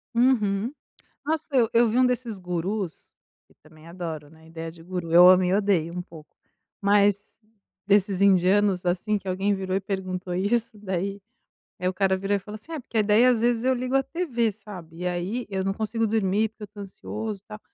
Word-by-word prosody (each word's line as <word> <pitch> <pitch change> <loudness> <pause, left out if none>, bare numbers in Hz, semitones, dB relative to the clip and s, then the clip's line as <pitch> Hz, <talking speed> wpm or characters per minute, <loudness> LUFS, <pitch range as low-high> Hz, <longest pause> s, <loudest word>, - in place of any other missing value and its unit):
Uhum. 230 -3 +2 0.5
Nossa, 310 -1 -2
eu 235 -4 +4
eu 235 0 +5
vi 225 - 0
um 255 - +5
desses 245 -3 -1
gurus, 180 0 -4 0.4
e - - -24
também 155 +1 -18
adoro, 165 -4 -6
né, 160 +1 -19
a - - -18
ideia 165 0 -7
de 165 0 -15
guru. 175 -2 -5
Eu 175 +1 +9
amo 185 0 +6
e 180 - +1
odeio 195 -5 +1
um 180 - -3
pouco, 160 -3 -14 0.5
mas 200 0 +2 0.5
desses 200 -2 +3
indianos 195 0 +3
assim, 190 +4 0
que 195 - -11
alguém 190 +2 0
virou 190 -1 -3
e - - +2
perguntou: 185 -2 -4
"Isso 215 +4 0
daí?". 195 0 -3 0.6
Aí 180 - -1
o - - -4
cara 190 0 +1
virou 195 +2 0
e - - -6
falou 210 +2 -9
assim: 220 +10 -12
"É, 315 - -3
porque 225 -4 -1
daí, 210 +4 +4
às 245 -3 +3
vezes, 235 -1 +1
eu 260 - +4
ligo 255 +1 -2
a 270 - +4
tv, 255 -10 -1
sabe, 185 -6 -11
e 180 - -2
aí 180 +8 -2
eu 190 -1 -2
não 195 - 0
consigo 220 +2 -1
dormir, 210 0 +1
porque 220 0 -14
eu - - -6
tô 205 +1 -14
ansioso 210 +1 -6
e - - -74
tal, 215 -1 -9
200 Hz, 210 wpm, -25 LUFS, 180-220 Hz, 0.6 s, Eu